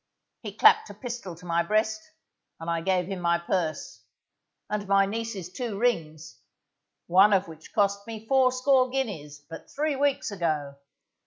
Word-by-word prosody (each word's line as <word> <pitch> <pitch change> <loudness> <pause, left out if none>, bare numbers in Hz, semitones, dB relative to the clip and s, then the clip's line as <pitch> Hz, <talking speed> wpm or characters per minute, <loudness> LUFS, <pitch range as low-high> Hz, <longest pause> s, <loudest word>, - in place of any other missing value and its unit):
He 210 -4 -7
clapped - - +5
a 205 - -10
pistol 235 -5 -6
to 180 +2 -15
my 170 0 +1
breast, 215 +4 0 0.6
and 165 - -8
I 165 -1 -1
gave 180 0 +1
him 190 0 -5
my 170 -1 +2
purse, 170 - -3 0.7
and 205 -1 -3
my 195 0 +4
niece's 205 -4 -5
two 235 -4 -4
rings, 165 -9 -2 0.7
one 195 +4 +5
of 195 0 +2
which 160 -1 -13
cost 200 0 0
me 225 -1 -8
fourscore 255 +1 +3
guineas, 155 - -4
but 165 - -10
three 300 0 -1
weeks 275 -4 0
ago. 155 -7 -2
195 Hz, 155 wpm, -26 LUFS, 170-230 Hz, 0.7 s, clapped